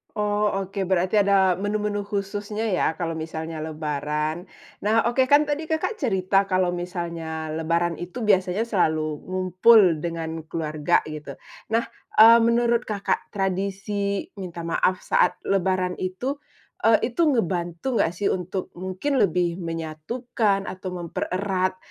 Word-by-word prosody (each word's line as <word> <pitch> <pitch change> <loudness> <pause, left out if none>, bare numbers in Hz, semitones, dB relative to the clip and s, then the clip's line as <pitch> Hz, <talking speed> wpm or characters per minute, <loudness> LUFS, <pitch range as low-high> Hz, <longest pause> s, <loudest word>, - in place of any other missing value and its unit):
Oh 210 0 +1 0.2
oke, 195 0 -4
berarti 185 +2 +2
ada 190 -3 +3
menu-menu 205 0 -1
khususnya 205 +2 -3
ya 170 -3 +1
kalau 170 -2 -3
misalnya 160 0 -5
lebaran. 155 +2 -3 0.4
Nah, 220 +2 +3
oke 250 +3 +2
kan 290 +2 +6
tadi 300 +2 -3
Kakak 320 +8 -1
cerita 195 - +1
kalau 185 -2 +1
misalnya 170 -3 -4
lebaran 170 +2 0
itu 180 +7 -6
biasanya 190 0 +2
selalu 155 -8 0
ngumpul 185 0 +4
dengan 165 0 -4
keluarga 155 -2 0
gitu. 155 -1 -7 0.4
Nah, 230 +1 +3 0.3
eee, 230 +2 +9
menurut 235 +1 +2
Kakak 205 -2 -1
tradisi 200 +1 -1 0.2
minta 175 -3 -6
maaf 180 +2 0
saat 180 - +2
lebaran 185 -1 +1
itu, 245 +10 -3 0.5
eee, 230 +2 +3
itu 340 - 0
ngebantu 175 - -1
nggak - - +2
sih 200 +2 -1
untuk 185 +1 -3
mungkin 190 +10 -2
lebih 175 -1 +1
menyatukan 195 +6 -2
atau 185 0 -6
mempererat 185 +2 -2
185 Hz, 130 wpm, -24 LUFS, 170-210 Hz, 0.5 s, eee